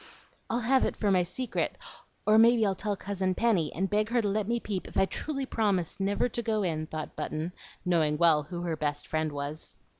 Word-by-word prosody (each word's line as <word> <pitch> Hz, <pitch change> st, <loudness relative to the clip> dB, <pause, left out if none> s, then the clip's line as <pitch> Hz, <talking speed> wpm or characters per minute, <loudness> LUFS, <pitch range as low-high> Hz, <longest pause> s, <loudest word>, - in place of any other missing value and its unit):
"I'll 235 Hz, +2 st, 0 dB
have 260 Hz, +3 st, +3 dB
it -, -, 0 dB
for 205 Hz, -2 st, +1 dB
my 185 Hz, -2 st, +4 dB
secret; 235 Hz, +7 st, -2 dB, 0.5 s
or 215 Hz, +1 st, +6 dB
maybe 230 Hz, 0 st, +6 dB
I'll 195 Hz, -, +2 dB
tell 205 Hz, +2 st, -2 dB
Cousin 190 Hz, -1 st, -2 dB
Penny, 200 Hz, -10 st, +2 dB
and 190 Hz, +3 st, -1 dB
beg 210 Hz, +2 st, +1 dB
her 240 Hz, +1 st, +2 dB
to 215 Hz, -, +1 dB
let 205 Hz, 0 st, 0 dB
me 235 Hz, +1 st, +1 dB
peep 200 Hz, -5 st, -4 dB
if -, -, -6 dB
I -, -, +5 dB
truly 275 Hz, +6 st, -3 dB
promise 200 Hz, -10 st, 0 dB
never 200 Hz, +4 st, +1 dB
to 240 Hz, 0 st, -3 dB
go 220 Hz, -2 st, 0 dB
in," 155 Hz, -3 st, -1 dB
thought 155 Hz, -1 st, -6 dB
Button, 155 Hz, +3 st, -3 dB, 0.3 s
knowing 160 Hz, -4 st, +2 dB
well 160 Hz, -2 st, +5 dB
who 170 Hz, +3 st, -6 dB
her 170 Hz, -2 st, -1 dB
best 145 Hz, -1 st, -2 dB
friend 155 Hz, -1 st, -1 dB
was. 145 Hz, +2 st, -6 dB
195 Hz, 215 wpm, -29 LUFS, 160-220 Hz, 0.5 s, or